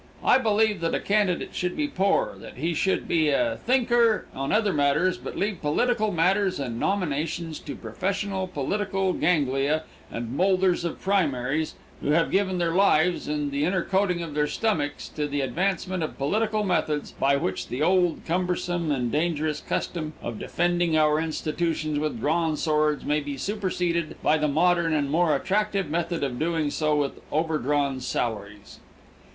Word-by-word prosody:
I 255 - +5
believe 215 -4 +2
that 165 - 0
a - - 0
candidate 200 -4 0
should 180 0 -2
be 300 - 0
poor; 200 -9 +1
that - - -11
he 165 +6 -1
should 190 +4 0
be 160 -3 +2
a 290 - +1
thinker 240 -3 +3
on 135 +1 -3
other 210 -2 +2
matters, 145 +6 +2
but - - -7
leave 200 -3 -1
political 215 +8 +1
matters 190 +1 +2
and 120 -4 -3
nominations 165 -3 -1
to - - -7
professional 190 0 -3
political 190 +4 -1
ganglia 150 -2 +1 0.3
and 120 +2 -5
molders 185 0 +2
of 170 - -4
primaries 155 -6 0 0.3
who - - -2
have 165 +1 +2
given 190 -1 +1
their 170 -1 +1
lives 180 -2 +3
and 150 -1 -2
the 140 +1 -1
inner 180 +2 +1
coating 190 -3 0
of 160 -3 -6
their 150 0 +1
stomachs 150 -8 -1
to 150 -1 -3
the 145 0 -2
advancement 185 +6 -1
of 155 - -4
political 215 +9 0
methods 155 -6 0
by 140 +1 +2
which 95 -9 -2
the 130 +5 -2
old, 180 -1 +2
cumbersome 175 -1 -1
and 125 -4 -1
dangerous 155 0 0
custom 155 -3 -3
of 115 - -5
defending 175 -1 +1
our 155 0 +3
institutions 155 -1 -1
with 150 -6 -2
drawn 160 +3 +1
swords 150 -2 +1
may 150 +1 +2
be 145 -1 -5
superseded 180 -3 -1
by - - +4
the 155 -1 +1
modern 170 +2 +2
and 140 -2 0
more 160 -1 +3
attractive 200 +2 0
method 170 -1 -1
of 125 -3 -2
doing 160 -2 0
so 155 0 +1
with 145 -2 -1
overdrawn 145 -3 0
salaries. 105 -5 -4
165 Hz, 165 wpm, -25 LUFS, 150-190 Hz, 0.3 s, I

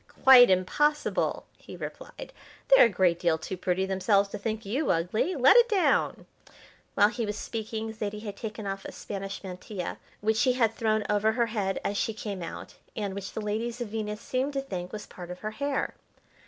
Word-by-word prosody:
"Quite 255 -2 +9
impossible!" 295 +12 +1
he - - -11
replied. - - -8 0.4
"They're - - +8
a - - -4
great 180 -3 +2
deal 170 -3 +2
too 160 +4 -5
pretty 185 +1 0
themselves 195 +1 +2
to 210 - -6
think 220 +1 -3
you 265 +9 -1
ugly. 185 - 0
Let 270 - +6
it 480 0 +6
down!" 405 -4 +1 0.7
While 205 0 +5
he 240 +1 -3
was 210 -1 -3
speaking 220 0 -4
Zaidie 210 -1 -5
had 205 -2 -6
taken 215 0 -6
off 195 0 -4
a - - -8
Spanish 195 0 -6
mantilla 185 0 -6 0.2
which 220 +1 +1
she 255 +2 +3
had 230 -3 +2
thrown 220 -1 0
over 210 +1 +2
her 235 0 +2
head 195 -3 -1
as 200 - -1
she 225 - -1
came 200 -3 -5
out, 165 - -7 0.2
and 205 -3 -3
which 195 0 -6
the 220 - -4
ladies 225 +3 -3
of 240 -3 -4
Venus 210 -1 -4
seemed 260 +3 -2
to 275 - -1
think 185 -9 -6
was 210 - -6
part 175 -1 -10
of 180 0 -8
her 215 - -3
hair. 280 +4 -2
210 Hz, 195 wpm, -28 LUFS, 195-235 Hz, 0.7 s, Quite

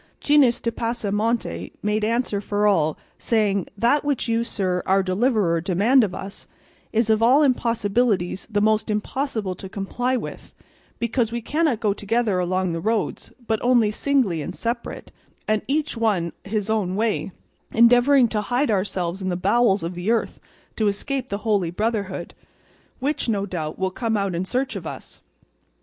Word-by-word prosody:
Gines 285 -5 +4
de 230 - -1
Pasamonte 230 0 -2
made 210 +1 0
answer 225 -2 0
for 205 +1 0
all, 160 -7 +2 0.2
saying, 205 -5 +1
"That 240 +7 +2
which 285 -4 -1
you, 230 0 +1
sir, 185 -5 -1
our 195 +1 +3
deliverer, 185 -3 +1
demand 205 +9 +3
of 190 -4 -2
us, 195 +1 -8 0.4
is 225 0 +2
of 220 0 +2
all 260 +6 +5
impossibilities 230 -7 +1
the 205 -2 0
most 215 +1 +2
impossible 215 -1 -2
to 190 +1 -9
comply 245 +6 -1
with, - - -8 0.4
because 235 0 0
we 235 - -2
cannot 290 0 0
go 210 -2 +2
together 210 -1 0
along 185 0 0
the 165 - -2
roads, 220 +2 -2
but 220 -1 0
only 240 -4 +3
singly 225 - +1
and - - -6
separate, 235 +1 -4 0.4
and 215 0 +1
each 295 +2 0
one 205 -7 0
his 210 0 -2
own 210 -4 0
way, 215 -2 -1 0.4
endeavouring 245 +3 +5
to 215 -1 -1
hide 245 +4 0
ourselves 185 -2 -1
in 185 - -2
the 175 - -1
bowels 200 0 +2
of 170 +2 -3
the 175 +4 -3
earth 230 -1 0 0.4
to 220 - +2
escape 255 +6 -2
the 200 - -2
Holy 200 -6 +2
Brotherhood, 200 -2 -2 0.6
which, 275 -1 -2
no 200 -3 0
doubt, 160 -5 -4
will 190 0 -1
come 225 +2 -1
out 200 -2 -1
in 170 +2 -2
search 255 +2 -2
of 175 -5 -5
us. - - -9
215 Hz, 165 wpm, -23 LUFS, 195-235 Hz, 0.6 s, all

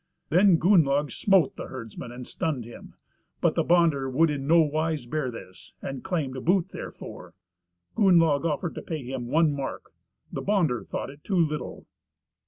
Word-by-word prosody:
Then 180 +1 +5
Gunnlaug 150 -5 +3
smote 190 -7 +3
the - - -6
herdsman, 120 -1 -8
and 125 +1 -8
stunned 140 -6 -3
him; 120 - -12 0.4
but - - +2
the - - +1
bonder 165 -6 +3
would 155 +5 +3
in 140 -2 -4
nowise 155 -3 +2
bear 130 +1 -2
this, 95 -6 -11
and 135 -2 -6
claimed 135 -7 -3
boot 180 +1 +2
therefor. - - -9 0.6
Gunnlaug 165 -8 +4
offered 165 +1 -1
to - - -6
pay 155 -4 -5
him 125 -1 -5
one 155 +3 +3
mark. 140 -1 -6 0.4
The - - -3
bonder 170 - +1
thought - - -5
it 145 +1 -17
too 195 - -1
little. 155 -3 -1
150 Hz, 160 wpm, -26 LUFS, 130-170 Hz, 0.6 s, Then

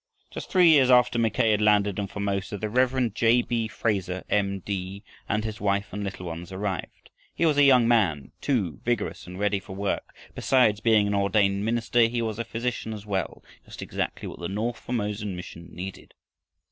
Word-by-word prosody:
Just - - -7
three 180 -3 +5
years 140 -5 +6
after 125 -1 +4
Mackay 115 -1 +2
had 105 0 +2
landed 105 -2 +3
in 100 - -2
Formosa, 100 0 -3
the 110 +2 -3
Rev. 125 -2 +1
J. 115 +2 +3
B. 115 -2 -1
Fraser, 95 -5 -2
M. 100 -1 +1
D., 95 +1 -5 0.3
and 110 0 0
his 110 0 -5
wife 100 -1 0
and 105 +1 -3
little 95 -2 -6
ones 85 +1 -7
arrived. 95 -1 -5 0.2
He 170 - +1
was 155 -3 +3
a - - +7
young 130 -4 +6
man, 95 - +2
too, 100 - -1
vigorous 120 -6 -2
and 90 +1 -8
ready 100 0 +1
for 95 -1 -10
work. 100 0 -3 0.2
Besides 120 -6 +3
being 110 -2 +4
an 100 - -1
ordained 100 0 +2
minister, 115 +1 +2
he 120 0 -2
was 110 -1 -3
a - - 0
physician 115 0 -4
as 105 -1 -8
well, 95 -4 -3 0.2
just - - -9
exactly - - -4
what - - -9
the 85 - -4
north 110 +4 -2
Formosan 105 -4 -3
mission 85 -1 -9
needed. 95 +2 -8
105 Hz, 190 wpm, -26 LUFS, 100-115 Hz, 0.3 s, a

